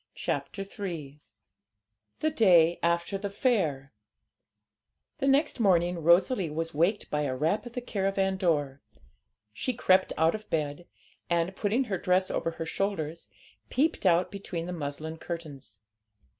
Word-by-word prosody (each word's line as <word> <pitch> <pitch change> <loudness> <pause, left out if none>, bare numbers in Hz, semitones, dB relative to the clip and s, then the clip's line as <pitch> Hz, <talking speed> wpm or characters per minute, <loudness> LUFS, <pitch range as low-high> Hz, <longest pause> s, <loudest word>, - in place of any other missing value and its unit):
CHAPTER 195 - -3
III 170 - -7 1.0
THE 310 - +2
DAY 175 - +5
AFTER 170 +3 0
THE 200 0 -3
FAIR 185 - 0 1.3
The 275 - 0
next 275 0 +2
morning 175 -4 +3
Rosalie 175 +4 +3
was 165 +2 -3
waked 175 +8 +1
by 150 - 0
a 135 -3 -1
rap 165 - 0
at 240 - -10
the 250 - -3
caravan 195 -3 0
door. 145 -7 0 0.7
She 255 - -2
crept 190 -5 +3
out 160 +1 +3
of 215 0 -7
bed, 155 +1 -2 0.4
and, 170 +2 0
putting 220 +7 +1
her 195 -7 -3
dress 185 +1 +2
over - - -1
her 165 0 -5
shoulders, 165 - -3 0.4
peeped 280 -6 +1
out 175 +1 +3
between 190 -4 -5
the 180 - -5
muslin 155 0 -5
curtains. 145 - -8
175 Hz, 140 wpm, -28 LUFS, 160-200 Hz, 1.3 s, DAY